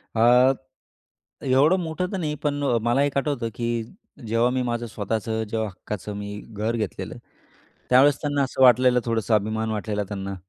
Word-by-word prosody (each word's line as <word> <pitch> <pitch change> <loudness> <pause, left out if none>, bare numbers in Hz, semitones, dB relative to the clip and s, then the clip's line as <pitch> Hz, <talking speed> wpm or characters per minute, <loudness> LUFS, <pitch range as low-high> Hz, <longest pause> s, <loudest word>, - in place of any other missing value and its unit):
अ, 125 +3 +5 0.9
एवढं 140 +7 +4
मोठं 165 +2 -2
तर - - -1
नाही, 150 -3 -2
पण 145 -1 0 0.3
मला 120 +4 +2
एक 145 -1 -2
आठवतं, 135 -5 -1
की 120 -1 -2 0.4
जेव्हा 115 +2 +2
मी 130 0 0
माझं 120 -1 -2
स्वतःचं 110 +1 -3
जेव्हा 110 -1 -2
हक्काचं 100 +1 -7
मी 105 0 -6
घर 110 +2 -2
घेतलेलं, 105 -4 -4 0.7
त्यावेळेस 135 +3 +6
त्यांना 145 -2 0
असं 130 0 -1
वाटलेलं, 125 0 +6
थोडंसं 115 -1 0
अभिमान 110 +1 0
वाटलेला 105 -1 -2
त्यांना 100 -1 -5
115 Hz, 155 wpm, -24 LUFS, 110-130 Hz, 0.9 s, त्यावेळेस